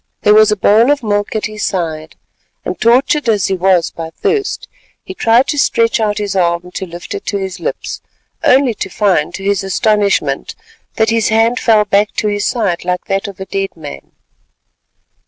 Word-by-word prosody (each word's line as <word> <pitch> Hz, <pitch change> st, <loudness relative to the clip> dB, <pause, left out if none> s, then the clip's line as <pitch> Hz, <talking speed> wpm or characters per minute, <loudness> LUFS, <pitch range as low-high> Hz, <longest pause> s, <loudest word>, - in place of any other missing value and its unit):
There 210 Hz, -, +5 dB
was 215 Hz, 0 st, +5 dB
a -, -, +2 dB
bowl 215 Hz, +5 st, +4 dB
of 290 Hz, -3 st, +1 dB
milk 205 Hz, 0 st, -1 dB
at 215 Hz, -, -1 dB
his 215 Hz, 0 st, -5 dB
side 160 Hz, -4 st, -3 dB, 0.5 s
and -, -, -5 dB
tortured 250 Hz, +4 st, +3 dB
as 205 Hz, -5 st, +2 dB
he -, -, +1 dB
was 185 Hz, -2 st, +2 dB
by 165 Hz, -1 st, -7 dB
thirst, 405 Hz, -, -2 dB, 0.4 s
he 375 Hz, -, -8 dB
tried 240 Hz, -6 st, +3 dB
to 290 Hz, -, 0 dB
stretch 230 Hz, -4 st, +2 dB
out 210 Hz, -2 st, 0 dB
his 205 Hz, -2 st, -3 dB
arm 175 Hz, -1 st, 0 dB
to 190 Hz, +1 st, -5 dB
lift 175 Hz, +1 st, -8 dB
it 405 Hz, -, -5 dB
to 200 Hz, -, -1 dB
his 190 Hz, -2 st, -5 dB
lips, -, -, -5 dB, 0.4 s
only 260 Hz, -2 st, +4 dB
to 195 Hz, -, -5 dB
find 185 Hz, -6 st, +1 dB
to 195 Hz, -, -7 dB
his 200 Hz, -1 st, 0 dB
astonishment 205 Hz, +1 st, 0 dB, 0.4 s
that 220 Hz, 0 st, +2 dB
his 225 Hz, -1 st, +1 dB
hand 225 Hz, +3 st, +2 dB
fell 215 Hz, -2 st, +3 dB
back 205 Hz, +1 st, +1 dB
to 215 Hz, -, -1 dB
his 205 Hz, 0 st, -1 dB
side 200 Hz, -8 st, -1 dB
like 180 Hz, 0 st, -2 dB
that 195 Hz, +2 st, -2 dB
of 200 Hz, -2 st, -10 dB
a 190 Hz, -, -5 dB
dead 195 Hz, -2 st, -4 dB
man. 70 Hz, -, -9 dB
205 Hz, 190 wpm, -15 LUFS, 190-225 Hz, 0.5 s, There